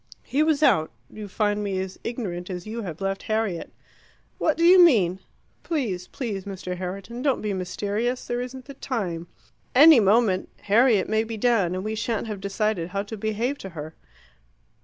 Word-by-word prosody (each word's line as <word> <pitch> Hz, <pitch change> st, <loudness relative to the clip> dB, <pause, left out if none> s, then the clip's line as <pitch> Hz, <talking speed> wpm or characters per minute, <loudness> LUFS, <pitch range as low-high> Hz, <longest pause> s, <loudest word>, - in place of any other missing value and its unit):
"He 280 Hz, -, 0 dB
was 310 Hz, -1 st, +2 dB
out. 160 Hz, -, +4 dB, 0.2 s
You 215 Hz, -1 st, -8 dB
find 205 Hz, +1 st, 0 dB
me 195 Hz, -2 st, -2 dB
as 190 Hz, 0 st, -5 dB
ignorant 195 Hz, -7 st, -4 dB
as 180 Hz, -2 st, -5 dB
you 225 Hz, +2 st, -5 dB
have 175 Hz, -4 st, -7 dB
left 195 Hz, 0 st, -2 dB
Harriet." 215 Hz, -6 st, -2 dB, 0.7 s
"What 310 Hz, -, +1 dB
do 335 Hz, -, +1 dB
you 360 Hz, +1 st, +8 dB
mean? 190 Hz, -, +4 dB, 0.4 s
Please, 220 Hz, -, -2 dB
please 210 Hz, -7 st, -4 dB
Mr. 185 Hz, -2 st, -5 dB
Herriton, 195 Hz, +6 st, -6 dB
don't 275 Hz, -2 st, +1 dB
be 210 Hz, -1 st, -1 dB
mysterious: 205 Hz, +6 st, -2 dB
there 240 Hz, 0 st, -2 dB
isn't 255 Hz, +1 st, -7 dB
the 275 Hz, -, -9 dB
time. 185 Hz, -11 st, -4 dB, 0.5 s
Any 300 Hz, 0 st, +9 dB
moment 205 Hz, -2 st, +3 dB
Harriet 220 Hz, -1 st, +3 dB
may 220 Hz, +1 st, +1 dB
be 225 Hz, 0 st, -6 dB
down, 205 Hz, -6 st, +2 dB
and 185 Hz, -, -3 dB
we 215 Hz, +1 st, -3 dB
shan't 225 Hz, 0 st, -2 dB
have 210 Hz, -3 st, -6 dB
decided 200 Hz, -3 st, -1 dB
how 200 Hz, +2 st, -2 dB
to 210 Hz, +2 st, -7 dB
behave 220 Hz, +6 st, -2 dB
to 195 Hz, -, -7 dB
her. 155 Hz, +1 st, -6 dB
210 Hz, 180 wpm, -25 LUFS, 190-240 Hz, 0.7 s, Any